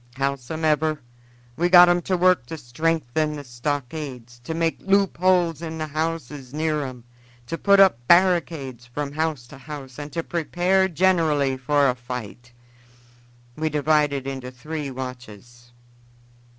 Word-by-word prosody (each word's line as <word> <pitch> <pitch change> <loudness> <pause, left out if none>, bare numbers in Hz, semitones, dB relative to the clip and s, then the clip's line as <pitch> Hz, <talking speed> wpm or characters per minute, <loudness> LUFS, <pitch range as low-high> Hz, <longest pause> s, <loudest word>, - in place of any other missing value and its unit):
Howsomever, 150 +3 0 0.6
we 175 +1 +1
got 175 0 +9
'em 175 0 +3
to 185 - +2
work 180 -8 +3
to 160 - -6
strengthen 155 +2 -1
the 145 - -7
stockades, 125 -1 -5
to 160 +6 -4
make 165 0 0
loop 195 0 +2
holes 175 -3 +2
in 160 -1 -5
the 155 - -3
houses 150 -3 -4
near 155 -1 0
'em, 130 -3 -8 0.4
to 165 - -4
put 200 +3 +4
up 150 -12 +4
barricades 165 -9 +2
from 140 +3 -4
house 155 -4 -2
to 135 +3 -13
house, 135 -2 -9
and 145 0 -7
to 165 - -2
prepare 175 +3 +1
generally 160 -6 +2
for 140 +2 +2
a 125 - +2
fight. 125 -1 -8 1.0
We 155 0 -1
divided 150 -2 +1
into 135 -2 -5
three 145 +4 -6
watches. 120 -2 -9
150 Hz, 140 wpm, -23 LUFS, 130-165 Hz, 1.0 s, got